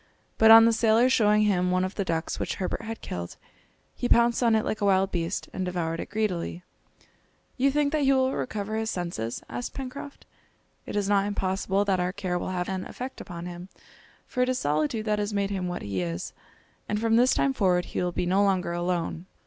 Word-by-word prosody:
But 220 Hz, -, +7 dB
on 225 Hz, 0 st, +10 dB
the 230 Hz, -, +4 dB
sailor 225 Hz, +2 st, +4 dB
showing 210 Hz, -3 st, +4 dB
him 180 Hz, -3 st, +2 dB
one 185 Hz, 0 st, +1 dB
of 185 Hz, -, -5 dB
the 200 Hz, -, -2 dB
ducks 165 Hz, -3 st, -2 dB
which -, -, -2 dB
Herbert 185 Hz, -, -3 dB
had 225 Hz, 0 st, -6 dB
killed, 85 Hz, 0 st, -6 dB, 0.6 s
he 245 Hz, -, -2 dB
pounced 235 Hz, +1 st, +4 dB
on 230 Hz, -2 st, +4 dB
it 220 Hz, -, +1 dB
like 215 Hz, -, -3 dB
a -, -, +2 dB
wild 195 Hz, -1 st, +3 dB
beast, 170 Hz, +1 st, -2 dB
and 190 Hz, -, -3 dB
devoured 170 Hz, -2 st, -2 dB
it -, -, -5 dB
greedily. 185 Hz, -5 st, -2 dB, 0.9 s
"You 270 Hz, +2 st, +3 dB
think 285 Hz, +1 st, +1 dB
that 310 Hz, -, 0 dB
he 275 Hz, -1 st, +4 dB
will 260 Hz, 0 st, +2 dB
recover 215 Hz, -2 st, -3 dB
his 220 Hz, 0 st, -1 dB
senses?" 170 Hz, -, -4 dB
asked 245 Hz, -, -6 dB
Pencroft. 275 Hz, +2 st, -7 dB, 0.6 s
"It -, -, -5 dB
is 205 Hz, -1 st, 0 dB
not 200 Hz, -1 st, +2 dB
impossible 195 Hz, 0 st, 0 dB
that 190 Hz, -2 st, +1 dB
our 180 Hz, +1 st, -1 dB
care 180 Hz, -3 st, -2 dB
will -, -, -4 dB
have 180 Hz, -1 st, -2 dB
an 190 Hz, -1 st, -3 dB
effect 255 Hz, +2 st, -7 dB
upon 170 Hz, -3 st, -7 dB
him, 175 Hz, +1 st, -8 dB, 0.6 s
for 250 Hz, -, -3 dB
it 250 Hz, -, +2 dB
is 255 Hz, -, 0 dB
solitude 155 Hz, +8 st, 0 dB
that 210 Hz, -1 st, 0 dB
has 205 Hz, 0 st, -2 dB
made 200 Hz, 0 st, 0 dB
him 190 Hz, -2 st, -2 dB
what 175 Hz, 0 st, -4 dB
he 100 Hz, -2 st, -2 dB
is, 85 Hz, -1 st, -4 dB, 0.6 s
and 210 Hz, -, 0 dB
from 225 Hz, 0 st, +2 dB
this 245 Hz, +3 st, +4 dB
time 275 Hz, -, +2 dB
forward 185 Hz, -7 st, +2 dB
he -, -, -3 dB
will 180 Hz, 0 st, 0 dB
be 175 Hz, -, -2 dB
no 190 Hz, +3 st, +2 dB
longer 185 Hz, -3 st, +1 dB
alone." 175 Hz, 0 st, -2 dB
200 Hz, 220 wpm, -26 LUFS, 180-225 Hz, 0.9 s, on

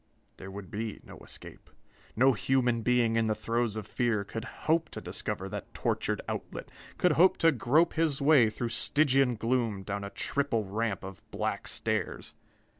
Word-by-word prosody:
There 95 Hz, -, -9 dB
would 95 Hz, -1 st, -9 dB
be 110 Hz, 0 st, -4 dB
no -, -, -12 dB
escape! -, -, -11 dB, 0.5 s
No 130 Hz, +3 st, +5 dB
human 120 Hz, +1 st, +1 dB
being 120 Hz, -1 st, +2 dB
in 115 Hz, -1 st, +2 dB
the 110 Hz, -, +1 dB
throes 115 Hz, 0 st, -1 dB
of 110 Hz, -2 st, -4 dB
fear 115 Hz, -2 st, 0 dB
could 110 Hz, +2 st, -6 dB, 0.2 s
hope 160 Hz, 0 st, +2 dB
to -, -, -6 dB
discover -, -, -4 dB
that -, -, -6 dB
tortured -, -, -1 dB
outlet, -, -, -5 dB, 0.3 s
could 180 Hz, -, +3 dB
hope 175 Hz, +5 st, +5 dB
to 165 Hz, -, +5 dB
grope 155 Hz, +6 st, +3 dB
his 160 Hz, -4 st, +1 dB
way 140 Hz, -6 st, +5 dB
through 115 Hz, +2 st, -3 dB
Stygian 135 Hz, 0 st, +3 dB
gloom 115 Hz, -3 st, 0 dB
down 100 Hz, +1 st, -4 dB
a 100 Hz, -, -5 dB
triple 115 Hz, +2 st, -1 dB
ramp 105 Hz, 0 st, -2 dB
of 95 Hz, -1 st, -8 dB
black -, -, -3 dB
stairs. -, -, -3 dB
115 Hz, 170 wpm, -30 LUFS, 105-135 Hz, 0.5 s, No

